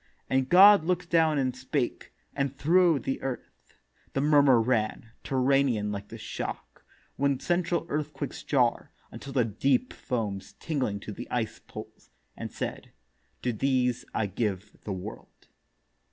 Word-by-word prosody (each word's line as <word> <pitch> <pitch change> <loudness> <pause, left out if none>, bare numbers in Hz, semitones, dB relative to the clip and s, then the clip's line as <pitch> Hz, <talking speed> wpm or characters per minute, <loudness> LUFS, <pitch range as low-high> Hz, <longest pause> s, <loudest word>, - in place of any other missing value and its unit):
And 130 0 +2
God 195 0 +8
look'd 180 0 -1
down 160 -3 +4
and 130 -2 0
spake, 130 0 -3 0.2
and 140 -1 -1
thro' 170 +1 +4
the 135 +1 -3
Earth 135 -2 -7 0.4
The 135 - 0
murmur 145 -4 +5
ran, 115 -1 0
terranean 130 -5 +2
like 100 0 -5
the - - -9
shock - - -6 0.3
When 140 -1 +1
central 175 -1 0
earthquakes 150 -2 -4
jar, - - +1 0.2
until 140 - -8
the 125 -4 +3
Deep 125 +4 +1
Foams 105 -6 -4
tingling 130 -11 -2
to 105 - -7
the - - -7
icèd 115 -3 -3
poles; - - -10 0.3
and - - -6
said, - - -5 0.5
To 125 - 0
these 125 0 +1
I 110 - 0
give 100 0 -3
the 105 - -3
World. 90 -1 -9
130 Hz, 140 wpm, -28 LUFS, 115-150 Hz, 0.5 s, God